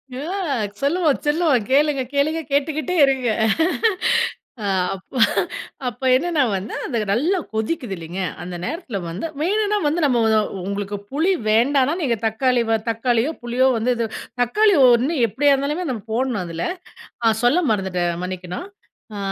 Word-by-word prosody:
அ, - - -5 0.6
சொல்லுவோம், 310 0 +2
சொல்லுவோம் 295 -6 +2
கேளுங்க, 285 0 +3
கேளுங்க 305 +3 +1
கேட்டுக்கிட்டே 305 +5 0
இருங்க. 265 -3 0 1.3
அ. - - -1 0.3
அப், 185 - -10 0.8
அப்ப 245 +2 -6
என்னன்னா 310 +1 +1
வந்து, 195 +5 -5
அது 235 -4 -1
நல்லா 320 - +1 0.2
கொதிக்குது 220 -1 -2
இல்லங்க? 170 +3 -6 0.2
அந்த 180 0 -6
நேரத்துல 280 - -4
வந்து 170 - -5 0.2
வேணுனா 420 +4 +1
வந்து 325 +4 0
நம்ம 250 -4 +2
ஒ 220 0 +4 0.3
உங்களுக்கு 200 0 -3
புளி 320 +7 +2 0.2
வேண்டான்னா, 265 +6 +3
நீங்க 245 -7 0
தக்காளி 245 +2 +1
வ 225 - +3
தக்காளியோ 235 +4 +1
புளியோ 245 +2 +2
வந்து 245 +3 +1
இது 230 -1 -1 0.3
தக்காளி 410 - +3 0.2
ஒண்ணு 260 +8 +1
எப்டியா 280 +7 +2
இருந்தாலுமே 295 +5 -1
நம்ம 225 -5 -5
போடணும் 240 -5 0
அதுல, 165 0 -4 0.6
நான் 220 -1 +3
சொல்ல 295 +9 +4
மறந்துட்டேன் 190 -4 0
மன்னிக்கணும். 180 - -5 0.5
அ - - -5
255 Hz, 140 wpm, -21 LUFS, 220-300 Hz, 1.3 s, ஒ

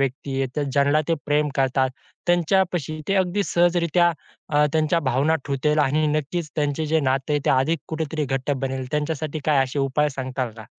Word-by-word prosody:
व्यक्ती 135 0 -2
आहे, 135 +3 -2
ज्यांला 140 +2 +3
ते 165 - +3
प्रेम 150 0 +2
करतात, 135 -1 +1 0.4
त्यांच्यापाशी 175 -3 +1
ते 195 - +2
अगदी 190 +2 +1
सहजरित्या 175 -1 +3 0.4
अ, 150 0 +3
त्यांच्या 160 +1 +2
भावना 140 +6 +2
ठेवतील 145 +2 0
आणि 150 +2 +2
नक्कीच 155 +2 -2
त्यांचे 150 +1 0
जे 160 +1 +2
नाते, 135 +2 0
ते - - +3
अधिक 135 +5 +2
कुठेतरी 155 -1 -2
घट्ट 135 +1 -2
बनेल. 135 -1 -2
त्यांच्यासाठी 150 0 -2
काय 145 -3 +3
असे 130 +2 -5
उपाय 140 +2 +1
सांगाल 130 -2 -4
का? 110 - -10
150 Hz, 165 wpm, -23 LUFS, 135-160 Hz, 0.4 s, ज्यांला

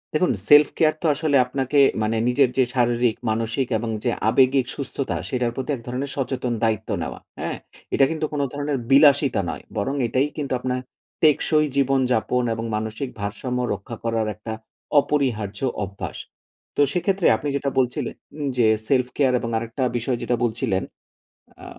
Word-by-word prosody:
দেখুন, 175 +4 +3 0.2
self-care 150 +1 +5
তো - - -4
আসলে 150 -1 0
আপনাকে 135 +2 -1 0.3
মানে 110 +1 0
নিজের 125 +1 +3
যে 130 - +5
শারীরিক, 120 -2 +2
মানসিক, 115 +4 -1
এবং 115 +1 -4
যে 120 - +1 0.2
আবেগিক 130 +2 +4
সুস্থতা, 140 -1 -3
সেটার 125 -2 0
প্রতি 130 - -5
এক 120 - -10
ধরনের 130 +3 -3
সচেতন 130 -2 -2
দায়িত্ব 110 -1 0
নেওয়া। 80 - -5 0.2
হ্যাঁ? - - -3 0.4
এটা 135 - +5
কিন্তু 160 -1 -1
কোন 145 - 0
ধরনের 145 0 -2
বিলাসিতা 140 -4 +5
নয় - - -6
বরং, 135 +2 -1
এটাই 130 +4 +1
কিন্তু 140 -3 -2
আপনার 125 0 -2 0.4
টেকসই 155 0 +4
জীবনযাপন 130 -3 +2
এবং 115 +1 -4
মানসিক 110 +5 -3
ভারসাম্য 120 +5 -3
রক্ষা 120 - -7
করার 115 -1 0
একটা 110 +1 -6 0.5
অপরিহার্য 120 -9 -1 0.2
অভ্যাস। 100 0 -6 0.6
তো - - +2
সেক্ষেত্রে 185 +1 +1
আপনি 145 - -5
যেটা 140 0 0
বলছিলেন, 125 -1 -1 0.4
যে 120 -2 +4 0.2
self-care 130 0 +2
এবং 115 - -4
আরেকটা 115 +3 -3
বিষয় 120 +1 -1
যেটা 120 - 0
বলছিলেন 110 -5 0 0.8
আ - - -9
125 Hz, 150 wpm, -23 LUFS, 115-140 Hz, 0.8 s, self-care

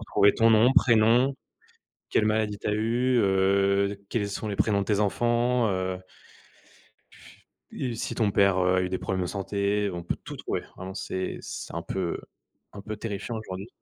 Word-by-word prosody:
retrouver 100 0 +3
ton 115 0 +4
nom, 115 +3 +5
prénom, 120 +3 +4 0.8
quelle 110 - +2
maladie 110 -1 0
t'as 105 - -2
eues, 120 +4 +1
heu, 100 +1 +2
quels 105 -2 -1
sont 105 +2 -4
les 100 - -3
prénoms 100 -2 +2
de 100 - -1
tes 105 -2 +1
enfants, 120 +3 +1
heu. 95 -1 -2 1.7
Et 125 -3 -4
si - - -4
ton 110 -3 +1
père, 100 -1 +3
heu, 90 0 +3
a - - +3
eu 90 - -1
des 95 - -2
problèmes 95 -1 -2
de 90 - -1
santé, 100 +1 -1
on 85 - -5
peut 85 - -3
tout - - -7
trouver. - - -3 0.2
Vraiment, 95 +1 -7
c'est 95 -2 -4
c'est - - -7
un 85 - -3
peu 90 -3 -3 0.5
un 100 - -9
peu 110 +1 -6
terrifiant 110 +1 -5
aujourd'hui. 100 0 -7
100 Hz, 180 wpm, -26 LUFS, 95-110 Hz, 1.7 s, nom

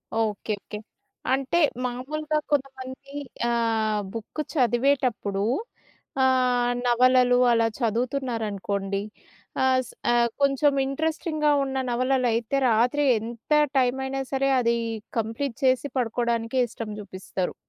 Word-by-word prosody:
Okay. 220 -1 -1
Okay. 210 - -7 0.6
అంటే 270 +5 0 0.3
మామూలుగా 305 +5 -2
కొంతమంది 270 -1 -3 0.4
ఆహ్, 225 -2 +1
బుక్ 230 +7 -5
చదివేటప్పుడు 240 -6 +1 0.8
ఆహ్, 250 -2 +3
నవలలు 250 +1 +4
అలా 230 -1 +3
చదువుతున్నారనుకోండి 225 -5 -2 0.6
ఆహ్, 260 0 +4
స్ - - -12 0.2
ఆహ్, 240 0 +3
కొంచెం 280 +1 +3
ఇంట్రెస్టింగ్‌గా 310 +1 0
ఉన్న 270 0 -4
నవలలయితే 245 -1 +1
రాత్రి 245 +6 +2
ఎంత 230 +5 -6 0.2
టైమైనా 265 +1 +1
సరే 270 0 +1
అది 235 -1 +2 0.4
కంప్లీట్ 225 +3 -2
చేసి 260 +1 +3
పడుకోవడానికే 235 0 0
ఇష్టం 225 -1 -7
జూపిస్తారు. 190 -2 -4
245 Hz, 100 wpm, -25 LUFS, 225-270 Hz, 0.8 s, నవలలు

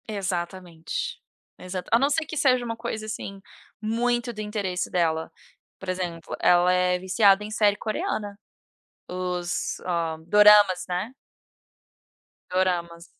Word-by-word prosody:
Exatamente. 180 -4 -4 0.4
Exato. 185 0 -6
A 230 - +5
não 275 +2 +3
ser 310 +2 0
que 310 - -6
seja 255 -4 +3
uma 230 -1 -3
coisa, 215 -1 -4
assim, 200 -2 -6 0.4
muito 240 +2 0
do 215 - -6
interesse 205 -4 -3
dela, 160 -2 0 0.5
por 190 - -7
exemplo, 175 -3 -4
ela 175 0 +4
é 180 0 +2
viciada 195 +2 +4
em 210 - -7
série 210 -2 +3
coreana, 215 - -3 0.7
os, 180 -1 -3
hã, 170 -3 -2
Doramas, 210 -1 +6
né. 185 +8 -3 1.4
Doramas. 175 -2 -1
190 Hz, 125 wpm, -25 LUFS, 180-215 Hz, 1.4 s, Doramas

